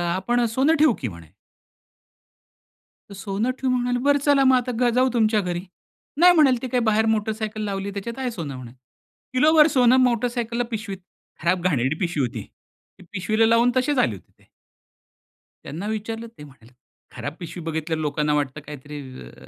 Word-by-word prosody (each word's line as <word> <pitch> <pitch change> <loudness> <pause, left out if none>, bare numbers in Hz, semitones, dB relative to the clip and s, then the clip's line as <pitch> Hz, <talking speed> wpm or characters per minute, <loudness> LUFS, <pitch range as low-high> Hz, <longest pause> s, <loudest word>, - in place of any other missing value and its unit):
आपण 240 +6 0
सोनं 265 +8 +2
ठेऊ 305 -5 +5
की 125 - -2
म्हणे. 85 -4 -13 1.8
तर - - -10
सोनं 200 +5 -2
ठेव 265 - -1
म्हणाले 245 -1 0
बरं 285 0 +5
चला 285 -2 +4
मग 260 -1 +5
आता 250 0 0
ग 245 -1 +3
जाऊ 255 +1 +3
तुमच्या 220 -2 +2
घरी. 175 -2 -3 0.6
नाही 355 +1 +7
म्हणाले 275 -6 +5
ते 260 - -3
काय 250 0 0
बाहेर 220 +1 +2
मोटर 220 -1 +1
सायकल 215 0 -5
लावली 200 0 -3
त्याच्यात 230 +5 -6
आहे 255 -2 -2
सोनं 160 - -6
म्हणे. 125 -2 -9 0.6
किलोभर 300 +4 +5
सोनं 250 0 +5
मोटर 245 -1 +2
सायकलला 240 0 -2
पिशवीत 210 -3 -4 0.4
खराब 175 +2 +1
घाणेरडी 140 -5 +1
पिशवी 170 -5 -1
होती. 120 - -6 0.6
ती - - -13
पिशवीला 215 +4 +1
लावून 230 +2 +4
तसेच 260 +3 +1
आले 120 - +2
होते 95 - -17
ते. - - -25 1.2
त्यांना 170 +8 -6
विचारलं 225 +1 -4
ते - - -11
म्हणाले, 130 -5 -17 0.4
"खराब 145 - -5
पिशवी 170 0 -8
बघितल्यावर 160 0 -3
लोकांना 150 0 0
वाटतं 145 0 -2
काहीतरी 145 0 -8 0.3
अ - - -16
215 Hz, 175 wpm, -23 LUFS, 160-245 Hz, 1.8 s, नाही